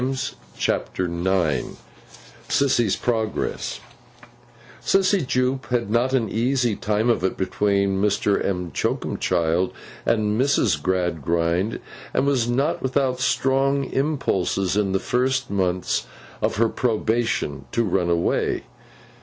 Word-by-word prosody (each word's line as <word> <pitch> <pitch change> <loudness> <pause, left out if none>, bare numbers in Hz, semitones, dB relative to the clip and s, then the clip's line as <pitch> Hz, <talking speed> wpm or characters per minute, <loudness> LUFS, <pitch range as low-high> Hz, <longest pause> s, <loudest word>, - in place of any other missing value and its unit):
CHAPTER 90 - -1
IX 85 -5 0 0.7
SISSY'S 120 -7 +2
PROGRESS 110 -3 -2 1.0
SISSY 195 0 +2
JUPE 130 +1 0
had 120 -4 -1
not 120 +3 +2
an 120 -4 +2
easy 120 +1 +1
time 105 +3 0
of 120 - +2
it, 95 - 0
between 100 0 +1
Mr. 105 0 +1
M'Choakumchild 90 -1 0 0.3
and 110 0 +1
Mrs. 140 +1 +2
Gradgrind, 85 - 0 0.4
and - - +2
was 130 -4 +1
not 135 +7 0
without 130 -1 0
strong 135 +1 +2
impulses, 100 - 0
in 100 -2 +1
the 95 - +2
first 130 +2 0
months 95 -2 0 0.3
of - - 0
her 115 +3 +3
probation, 110 - -1
to 115 - +1
run 90 -4 0
away. 85 0 +1
110 Hz, 110 wpm, -23 LUFS, 95-130 Hz, 1.0 s, her